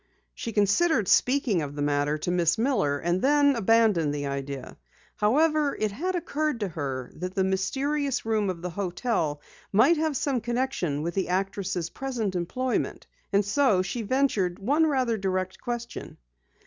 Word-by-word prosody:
She 230 Hz, -, -5 dB
considered 215 Hz, -, +2 dB
speaking 250 Hz, -8 st, +3 dB
of 145 Hz, -1 st, -5 dB
the 145 Hz, -, -2 dB
matter 145 Hz, +1 st, +1 dB
to 165 Hz, +3 st, -2 dB
Miss 175 Hz, 0 st, +2 dB
Miller, 220 Hz, -, +1 dB
and 175 Hz, +5 st, -1 dB
then 285 Hz, 0 st, +4 dB
abandoned 215 Hz, -9 st, +3 dB
the 145 Hz, 0 st, -3 dB
idea. 140 Hz, -1 st, -5 dB, 0.4 s
However, 300 Hz, +6 st, +2 dB
it 215 Hz, -1 st, 0 dB
had 360 Hz, -, -2 dB
occurred 310 Hz, -5 st, -1 dB
to 200 Hz, -, -1 dB
her 135 Hz, -6 st, -4 dB
that 180 Hz, +2 st, -6 dB
the 190 Hz, -, +2 dB
mysterious 270 Hz, +10 st, -1 dB
room 215 Hz, -3 st, +1 dB
of 175 Hz, -2 st, -5 dB
the 180 Hz, -, -3 dB
hotel 175 Hz, -5 st, -2 dB, 0.3 s
might 250 Hz, +12 st, +5 dB
have 310 Hz, -3 st, 0 dB
some 265 Hz, -4 st, 0 dB
connection 235 Hz, -, -1 dB
with 170 Hz, +1 st, -2 dB
the 190 Hz, -2 st, -1 dB
actress' 190 Hz, -2 st, -1 dB
present 240 Hz, -7 st, -3 dB
employment, 245 Hz, +9 st, -2 dB, 0.3 s
and 200 Hz, 0 st, +3 dB
so 205 Hz, -4 st, +3 dB
she 195 Hz, +6 st, -3 dB
ventured 215 Hz, -7 st, +1 dB
one 285 Hz, +10 st, +2 dB
rather 255 Hz, -6 st, +1 dB
direct 185 Hz, -1 st, -2 dB
question. 240 Hz, -1 st, -5 dB
205 Hz, 160 wpm, -26 LUFS, 175-265 Hz, 0.4 s, might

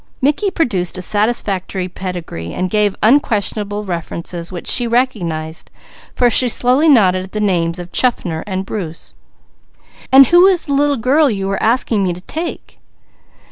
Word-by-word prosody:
Mickey 295 Hz, +10 st, +1 dB
produced 230 Hz, -, -1 dB
a -, -, -5 dB
satisfactory 200 Hz, -3 st, -1 dB
pedigree, 175 Hz, -, -7 dB
and 185 Hz, 0 st, -3 dB
gave 210 Hz, -2 st, +1 dB
unquestionable 210 Hz, -4 st, +1 dB
references 170 Hz, -1 st, -5 dB
which 175 Hz, -2 st, -7 dB
she 245 Hz, -1 st, +5 dB
recognized, 175 Hz, -11 st, -2 dB, 0.5 s
for 245 Hz, -, +3 dB
she 245 Hz, +1 st, +3 dB
slowly 255 Hz, +7 st, +2 dB
nodded 185 Hz, -9 st, +4 dB
at 190 Hz, -, -16 dB
the 210 Hz, -, -3 dB
names 175 Hz, -4 st, 0 dB
of 175 Hz, 0 st, -9 dB
Chaffner 180 Hz, -10 st, -1 dB
and 190 Hz, -1 st, -3 dB
Bruce. 170 Hz, -6 st, -7 dB, 1.0 s
"And 270 Hz, +1 st, +8 dB
who 350 Hz, +6 st, +5 dB
is 370 Hz, -3 st, +1 dB
the 285 Hz, -, -3 dB
little 285 Hz, 0 st, +1 dB
girl 275 Hz, +6 st, +2 dB
you 195 Hz, -4 st, -3 dB
are 195 Hz, -, -2 dB
asking 225 Hz, -2 st, +1 dB
me 180 Hz, -2 st, 0 dB
to 175 Hz, -, -10 dB
take?" 325 Hz, -, -6 dB
205 Hz, 155 wpm, -16 LUFS, 180-255 Hz, 1.0 s, And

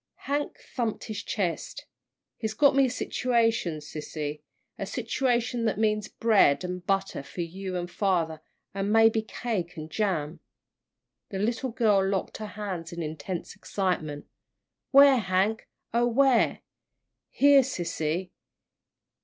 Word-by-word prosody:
Hank 290 Hz, +1 st, -2 dB
thumped 235 Hz, -4 st, -3 dB
his 215 Hz, -3 st, -5 dB
chest. 185 Hz, -7 st, -3 dB, 0.5 s
"He's 215 Hz, -1 st, -3 dB
got 285 Hz, +3 st, +5 dB
me 275 Hz, -1 st, +5 dB
a -, -, 0 dB
situation, 230 Hz, -10 st, 0 dB
sissy, 150 Hz, 0 st, -5 dB, 0.4 s
a -, -, -3 dB
situation 245 Hz, -3 st, 0 dB
that 220 Hz, -, 0 dB
means 215 Hz, -1 st, +1 dB
bread 205 Hz, -10 st, +3 dB
and 180 Hz, 0 st, -4 dB
butter 195 Hz, -2 st, -1 dB
for 155 Hz, +5 st, -7 dB
you 185 Hz, +2 st, -5 dB
and 175 Hz, 0 st, -3 dB
father, 170 Hz, -5 st, 0 dB, 0.3 s
and 195 Hz, +1 st, -1 dB
maybe 225 Hz, 0 st, +5 dB
cake 215 Hz, -6 st, -4 dB
and 155 Hz, 0 st, -7 dB
jam." 170 Hz, -7 st, -1 dB, 0.9 s
The 195 Hz, -, -4 dB
little 230 Hz, +6 st, -1 dB
girl 215 Hz, -4 st, +3 dB
locked 195 Hz, -1 st, -1 dB
her 215 Hz, -, -5 dB
hands 195 Hz, -5 st, -5 dB
in 170 Hz, -1 st, -4 dB
intense 160 Hz, +3 st, -5 dB
excitement. 155 Hz, -7 st, -2 dB, 0.6 s
"Where, 275 Hz, -1 st, +8 dB
Hank, 195 Hz, +2 st, 0 dB, 0.3 s
oh, 240 Hz, +1 st, +3 dB
where?" 255 Hz, 0 st, +3 dB, 0.7 s
"Here, 280 Hz, 0 st, +6 dB
sissy." 175 Hz, -, -2 dB
200 Hz, 130 wpm, -27 LUFS, 175-230 Hz, 0.9 s, Where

